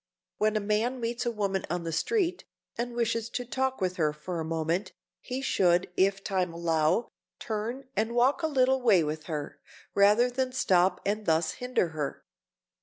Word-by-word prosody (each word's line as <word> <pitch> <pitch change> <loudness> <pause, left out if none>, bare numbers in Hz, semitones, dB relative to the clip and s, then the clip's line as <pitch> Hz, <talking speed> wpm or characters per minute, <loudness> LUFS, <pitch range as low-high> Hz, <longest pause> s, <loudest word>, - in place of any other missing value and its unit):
When 215 0 +2
a - - +3
man 215 +5 0
meets 235 +1 -2
a - - +1
woman 200 -4 -1
on 175 +1 -2
the 165 - -3
street, 360 - 0 0.3
and 240 0 -3
wishes 230 -1 0
to 245 +1 -4
talk 265 +2 -1
with 185 -1 -1
her 155 -3 +2
for 165 +3 -5
a - - -2
moment, 165 +3 -1 0.3
he 255 +1 -5
should, 180 -7 +2
if 195 +1 +2
time 185 -3 0
allow, 165 +4 +1 0.3
turn 235 +5 -4
and 225 +2 0
walk 255 +7 +3
a 320 - +1
little 265 -2 +2
way 205 -9 +5
with 155 +1 -4
her, 150 -4 -5 0.3
rather 210 +5 +5
than 255 0 -1
stop 185 -6 +2
and 210 +1 -1
thus 160 0 +2
hinder 250 -8 +1
her. 150 -3 -4
210 Hz, 180 wpm, -28 LUFS, 170-245 Hz, 0.3 s, way